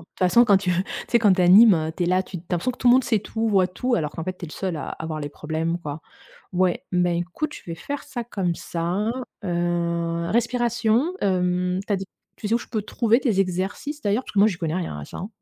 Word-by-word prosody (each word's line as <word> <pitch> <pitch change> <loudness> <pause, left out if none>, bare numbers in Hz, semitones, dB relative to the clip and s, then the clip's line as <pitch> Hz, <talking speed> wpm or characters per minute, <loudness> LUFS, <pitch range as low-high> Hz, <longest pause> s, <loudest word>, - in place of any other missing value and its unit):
toute 165 - -20
façon, 185 +6 +5
quand 205 -4 +5
tu 190 -1 0
tu 180 +2 +1 0.3
sais, 235 - +4
quand 205 -4 +5
tu 185 - -1
animes, 195 +4 +8
heu, 160 0 -1
tu - - -1
es - - +1
là, 185 +1 +3
tu 185 - -8
tu - - -6
as 175 - -33
l'impression 180 +8 0
que - - -16
tout 250 - +3
le 240 - +8
monde 260 0 +4
sait 220 -4 +1
tout, 225 +1 -3
voit 190 -3 +3
tout, 245 +7 -1
alors 150 -7 -1
qu'en 165 +1 -6
fait, 185 0 -4
tu - - -8
es 165 - -7
le - - -11
seul 185 -3 -3
à 150 - -5
à 160 - -6
voir 155 -1 -4
les 145 - -4
problèmes, 160 +3 -3
quoi. 150 -2 -6 0.5
Ouais, 185 0 +1
ben, 180 -1 +2
écoute, 180 - -3
je - - -10
vais 165 - -4
faire 285 +11 -5
ça 240 -2 -6
comme 185 -7 -2
ça, 175 +5 -2 0.4
heu, 170 -1 -1
respiration, 240 +4 +1
hem, 180 -1 +1
tu - - -1
as 200 - +3
dit 195 - -5 0.3
tu 210 - -5
sais 225 - +2
où 235 - +3
je - - -10
peux 215 -3 -2
trouver 230 +3 +2
tes 225 -8 +1
exercices, 195 - -2
d'ailleurs, 210 +5 0
parce - - -9
que 200 - +3
moi, 215 - +6
j'y 185 - -3
connais 165 -2 -2
rien 170 - -3
à 75 - -6
ça, - - -9
hein. 190 - -5
185 Hz, 275 wpm, -24 LUFS, 170-220 Hz, 0.5 s, animes